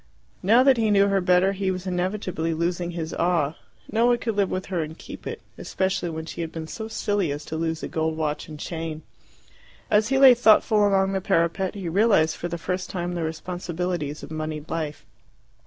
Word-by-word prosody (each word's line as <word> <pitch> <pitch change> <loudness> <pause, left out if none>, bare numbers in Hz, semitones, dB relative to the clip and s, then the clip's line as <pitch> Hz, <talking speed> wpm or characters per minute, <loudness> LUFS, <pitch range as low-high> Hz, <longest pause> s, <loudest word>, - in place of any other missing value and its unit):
Now 225 +7 +5
that 265 -2 +5
he 220 -2 +2
knew 200 -1 +4
her 195 -1 +2
better, 180 +1 +4
he 195 -1 -2
was 185 0 -3
inevitably 180 -3 -2
losing 175 +1 -1
his 165 -2 -4
awe: 165 -4 +1 0.4
no 230 +2 +3
one 240 0 +4
could 225 -2 -3
live 200 -2 +2
with 185 0 -3
her 180 -3 -2
and 160 +1 -6
keep - - -9
it, - - -6 0.2
especially 190 -2 -1
when 160 0 -5
she 170 - -6
had 165 -1 -4
been 160 -1 -6
so 220 +7 -6
silly 205 -6 -1
as 145 +1 -5
to 160 - -5
lose 160 0 -2
a - - -2
gold 160 0 -1
watch 150 -2 -2
and 155 -2 -9
chain. 160 -1 -5 0.9
As 210 0 +4
he 270 +2 +1
lay 265 -2 +9
thoughtful 215 -2 +4
along 195 -1 +2
the 190 -1 -1
parapet, 185 +1 +1
he 195 -4 -5
realized 175 -3 +3
for 175 - -4
the 170 0 -4
first 180 +2 -3
time 175 -1 -3
the 175 - -3
responsibilities 170 -1 -3
of - - -9
monied 155 -1 -5
life. 155 -3 -4
180 Hz, 205 wpm, -24 LUFS, 160-195 Hz, 0.9 s, lay